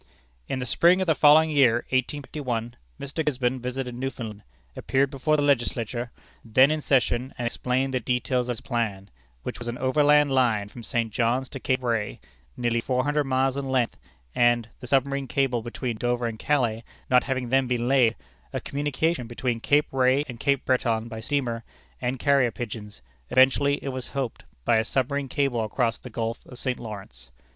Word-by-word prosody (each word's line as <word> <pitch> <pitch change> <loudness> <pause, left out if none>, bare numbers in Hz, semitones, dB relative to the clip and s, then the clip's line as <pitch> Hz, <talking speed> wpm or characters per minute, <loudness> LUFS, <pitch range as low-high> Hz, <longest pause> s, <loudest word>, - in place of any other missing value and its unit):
"In - - -2
the 125 - -3
spring 170 +9 +4
of 190 - +1
the 165 - +3
following 155 +2 +6
year 125 -5 +4
(1851), 130 -3 -2 0.2
Mr. 140 +4 -3
Gisborne 130 -3 0
visited 125 0 -4
Newfoundland, 120 -4 -5 0.3
appeared 135 +1 +1
before 155 +2 +1
the 145 - +1
Legislature, 120 -3 0 0.3
then 130 +5 +5
in 155 0 -1
session, 130 -2 +1
and 120 - -3
explained 130 +3 -1
the 130 - +1
details 125 +1 -1
of - - +1
his 115 - -9
plan, 105 -5 -3 0.3
which - - -5
was 120 - -6
an 120 +1 -3
overland 145 +2 +4
line 115 -6 +2
from 120 - -10
St. 115 -2 -2
John's 125 +2 +1
to 135 - -7
Cape 130 0 -1
Ray, 115 -4 -1 0.4
nearly 120 -1 0
four 125 +1 0
hundred 145 +1 +1
miles 135 0 +1
in 140 -1 -3
length, 130 -3 +1 0.4
and 120 -1 +3
(the 125 - -9
submarine 140 +1 +1
cable 125 -3 0
between 120 0 -4
Dover 120 +1 0
and 115 -2 -4
Calais 120 -6 0 0.2
not 125 0 +4
having 130 -2 -2
then 135 0 +3
been 120 -1 0
laid) 125 -4 +4 0.4
a - - -2
communication 145 -1 -1
between 120 0 -2
Cape 145 +5 +3
Ray 130 +1 +3
and 120 -3 -8
Cape 140 0 +1
Breton 115 -3 +1
by 110 -1 -6
steamer 115 -1 -2 0.4
and 125 +2 -1
carrier 140 -2 +3
pigeons, 105 - -7 0.3
eventually, 140 +2 +4
it 140 - -3
was 130 -1 -5
hoped, 135 -4 -4 0.2
by 115 - +4
a 110 - +2
submarine 135 +4 -1
cable 135 -5 0
across 115 +2 -1
the 125 - -10
Gulf 115 0 -3
of 125 - -10
St. 125 0 -2
Lawrence. 95 - -9
125 Hz, 180 wpm, -25 LUFS, 120-135 Hz, 0.4 s, following